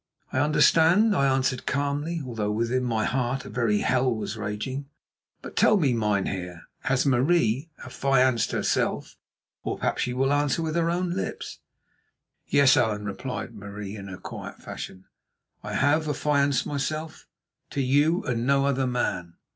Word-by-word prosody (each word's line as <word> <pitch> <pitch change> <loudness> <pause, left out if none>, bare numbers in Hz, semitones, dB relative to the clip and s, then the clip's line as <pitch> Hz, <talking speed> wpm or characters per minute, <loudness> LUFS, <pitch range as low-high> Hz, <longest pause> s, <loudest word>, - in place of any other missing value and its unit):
"I 130 - +1
understand," 160 +8 +4
I 140 -5 +3
answered 130 -1 0
calmly, 145 +3 -1
although 110 -4 -3
within 115 +4 0
my 115 -3 0
heart 130 0 -1
a - - -8
very 105 -2 +1
hell 130 0 +2
was 110 -1 -3
raging. 110 +7 -4 0.6
"But - - -9
tell 215 - +5
me, 145 -9 +2
mynheer, 95 -5 -1 0.2
has 135 0 +2
Marie 135 0 +2 0.2
affianced 130 -2 +2
herself—or - - -3
perhaps - - -1
she 125 - -1
will 135 +2 +2
answer 145 +3 +1
with 160 -1 -2
her 170 -1 +2
own 175 +1 -1
lips?" 190 - -4 0.9
"Yes, 140 -2 +5
Allan," 105 -3 +1
replied 120 +4 -5
Marie 100 -1 -7
in 100 -2 -8
her 95 -1 -7
quiet - - -8
fashion, 95 0 -8 0.6
"I - - -6
have 155 +3 +2
affianced 140 -2 +1
myself—to 155 0 -6
you 145 +7 +2
and 120 -1 -2
no 140 0 +3
other 135 -1 +1
man." 90 -9 -2
130 Hz, 145 wpm, -26 LUFS, 110-145 Hz, 0.9 s, tell